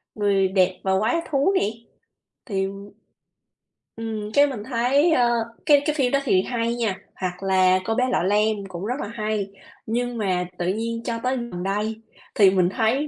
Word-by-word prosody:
"Người 200 -2 +2
Đẹp 185 -1 +2
Và 190 0 +2
Quái 220 +7 +1 0.2
Thú" 285 +8 +2
nè, - - +1 0.8
thì, 195 -1 0 1.3
ừm, 215 -2 -4
cái 285 0 +5
mình 235 -7 -5
thấy, 265 +7 +2
ơ, 245 -5 +4 0.4
cái 290 -2 +6
cái 305 -1 0
phim 265 -3 +1
đó 275 - +3
thì 190 -8 +3
hay 235 -1 -1
nha, 225 -5 -1 0.2
hoặc 185 -1 -3
là 185 -1 +4
"Cô 225 - 0
bé 255 - +2
Lọ - - +1
Lem" 210 +2 +2
cũng 185 +1 -6
rất 250 +5 -2
là - - -4
hay. 215 -2 -2 0.4
Nhưng 240 +1 -2
mà 185 -4 0
tự 175 - -2
nhiên 230 +4 -2
cho 230 -1 -3
tới 255 +1 0
gần 210 -7 -5
đây 210 +3 -2 0.3
thì 200 -3 +7
mình 185 -2 +2
thấy 235 +9 0
220 Hz, 185 wpm, -23 LUFS, 195-245 Hz, 1.3 s, thì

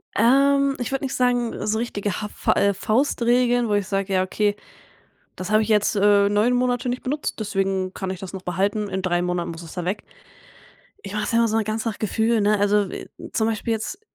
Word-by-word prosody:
Ähm, 275 +4 +4
ich 245 - -3
würde 270 0 -1
nicht 265 - -3
sagen, 245 -2 0
so 215 +1 0
richtige 205 -4 -3
haf 210 - -9
äh, 200 0 +3
Faustregel, 240 +2 +2
wo 210 - 0
ich 205 -2 0
sage: 195 -1 -1
„Ja 185 0 +3
okay, 205 +2 0 0.8
das 185 +2 -5
habe 215 +1 +4
ich 215 - -3
jetzt, 210 0 +2
äh, 200 0 +4
9 215 +4 +2
Monate 245 0 0
nicht 250 +1 -2
benutzt, 290 +3 -3
deswegen 195 -2 -1
kann 190 -1 -4
ich 190 - -4
das 190 -1 -8
noch 190 -1 -7
behalten. 200 +4 -1
In 190 0 -2
3 175 -1 +1
Monaten 180 -1 -2
muss 165 +1 -8
es 165 - -10
da 180 -2 -4
weg.“ 200 +3 -2 1.0
Ich 200 0 -8
mach's 210 - -2
ja 230 - +3
immer 230 -1 +3
so 220 +1 +1
ganze 220 +1 -2
Gefühl, 220 +1 +1
ne? 210 0 +3
Also, 205 -1 +2
w - - -7 0.3
zum 220 - +1
Beispiel 225 +1 -1
jetzt, 295 - -5
210 Hz, 210 wpm, -23 LUFS, 195-235 Hz, 1.0 s, Ähm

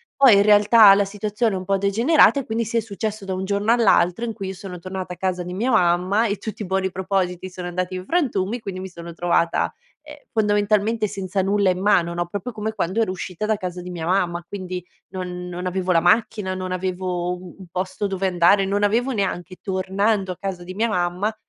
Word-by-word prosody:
Poi, 265 -6 +7
in 200 - +5
realtà 210 0 +7
la 200 - +3
situazione 210 +1 -1
è - - -1
un 185 - -6
po' 195 0 +1
degenerata 235 +10 +4
e 270 - -5
quindi, 225 +1 -1
sì, 230 +2 -2
è - - +4
successo 215 -1 -5
da 190 - -3
un 185 +1 -3
giorno 205 +3 +1
all'altro 225 -3 +3
in 230 - -2
cui 200 -3 -6
io 190 - -4
sono 180 -1 -8
tornata 185 0 -6
a - - -12
casa 185 -2 -2
di 180 +1 -6
mia 235 +7 0
mamma 185 +3 +3
e 200 0 -2
tutti 215 -1 -7
i - - -3
buoni 190 0 -1
propositi 185 -1 -2
sono 180 -1 -7
andati 180 +1 -3
in 185 0 -6
frantumi. 240 - 0
Quindi, 190 -3 -6
mi 190 - -5
sono 170 -1 -9
trovata, 170 0 +1 0.3
ehm, 300 -1 -11 0.2
fondamentalmente 210 +1 +1
senza 195 -1 -2
nulla 195 0 +2
in 180 +1 -3
mano, 175 -4 +3
no, 175 0 -1
proprio 205 +7 -5
come 215 +1 -3
quando 200 +2 -1
ero 185 - 0
uscita 185 +2 -5
da 215 -1 +1
casa 180 -1 -5
di 180 - -8
mia 170 -2 -5
mamma. 175 -2 0
Quindi, 185 -2 -6 0.2
non 180 -1 -6
non 180 +1 -5
avevo 185 0 -1
la 165 - +5
macchina, 205 +1 +1
non 185 0 -5
avevo 180 -1 -2
u 180 -1 -10
un 185 - -11
posto 185 +2 -2
dove 190 0 -1
andare, 185 +2 +4
non 200 +1 0
avevo 235 +6 +2
neanche 185 -4 -3
tornando 195 +1 0
a - - -18
casa 190 -3 -5
di 185 +1 -8
mia 225 +3 +1
mamma 180 +4 -1
190 Hz, 225 wpm, -22 LUFS, 180-210 Hz, 0.3 s, Poi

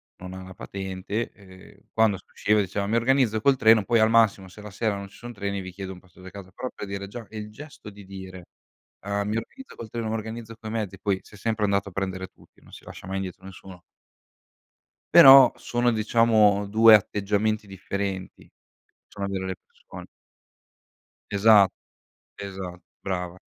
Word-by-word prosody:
non 90 0 -10
ha 95 0 -8
la 95 0 -11
patente, 95 +4 -5
uhm, 95 -2 -17
quando 110 -3 +2
si - - -18
usciva 105 0 +1
diceva: 100 +1 -3
"Mi 110 - 0
organizzo 115 -2 +2
col 135 +3 +3
treno 110 -2 +5
poi, 115 +4 +2
al 110 0 +4
massimo, 105 -4 +3
se 105 +3 -13
la 105 - -9
sera 105 +1 -2
non 100 0 -7
ci - - -18
son 120 0 -9
treni 100 -1 -4
vi 95 -1 -7
chiedo 95 0 -7
un 90 - -10
passaggio 90 0 -17
a - - -7
casa." 95 -1 -11
Però 130 +7 -6
per - - -7
dire 100 0 -5
già 110 +2 -9
è 110 - -14
il 105 0 -6
gesto 145 -2 -11
di 100 -1 -14
dire, 95 -2 -10 0.6
uhm: 100 0 -2
"Mi 110 +2 -1
organizzo 265 - -9
col 115 - -9
treno, 115 0 -4
mi - - -2
organizzo 110 +1 -7
coi 110 - -8
mezzi." 100 -4 -4
Poi 100 -2 -1
si - - -19
è - - -13
sempre 110 0 -1
andato 100 0 0
a - - -16
prendere 95 0 -4
tutti, - - -25
non - - -19
si - - -13
lascia - - -11
mai 95 +1 -3
indietro 95 -2 -6
nessuno. 95 -1 -12 1.3
Però 135 -6 +10
sono, 120 0 0
diciamo 110 -2 +3
2 110 +2 +7
atteggiamenti 105 +1 0
differenti. 95 0 -6 0.6
Sono 100 -1 -5
delle 95 -1 -3
persone. - - -14 1.2
Esa 105 -1 +6 0.7
esa 95 -3 -7 0.2
brava. 90 -2 -4
100 Hz, 185 wpm, -25 LUFS, 95-110 Hz, 1.3 s, Però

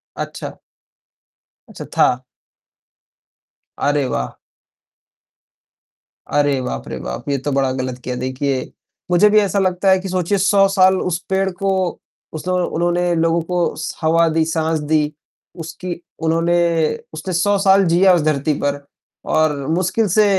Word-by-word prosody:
अच्छा। - - -6 1.1
अच्छा, - - -9
था। 125 +1 +3 1.5
अरे 145 -1 +1
वाह! 65 -1 -3 1.9
अरे 145 -2 +1
बाप 125 - -5
रे 65 0 -5
बाप! 60 - -6
ये 140 - +1
तो 145 +2 -3
बड़ा 135 -1 +1
गलत 130 -1 -4
किया, 125 0 -3
देखिए 130 +1 -2 0.4
मुझे 210 +4 +5
भी 215 0 +5
ऐसा 200 -1 +1
लगता 185 0 +1
है 190 - +4
कि 190 0 -6
सोचिए 185 +2 0
100 195 +1 +4
साल 190 -1 +4
उस 175 -2 -1
पेड़ 190 0 +1
को, 190 -1 -1 0.3
उसने 180 +4 -3
उन्होंने 175 +1 0
लोगों 165 +1 +2
को 175 +1 -1
स 160 - -5
हवा 165 +1 +3
दी, 160 0 +1
साँस 160 -1 0
दी, 150 0 0 0.5
उसकी 165 +2 -6 0.3
उन्होंने 165 +2 +2 0.6
उसने 165 +4 -5
100 200 +4 +2
साल 195 0 +4
जिया 180 +3 +5
उस 170 - +3
धरती 150 0 +1
पर 145 0 -2 0.4
और 155 -1 +2
मुश्किल 185 +6 +1
से 210 +4 +4
165 Hz, 140 wpm, -19 LUFS, 145-185 Hz, 1.9 s, मुझे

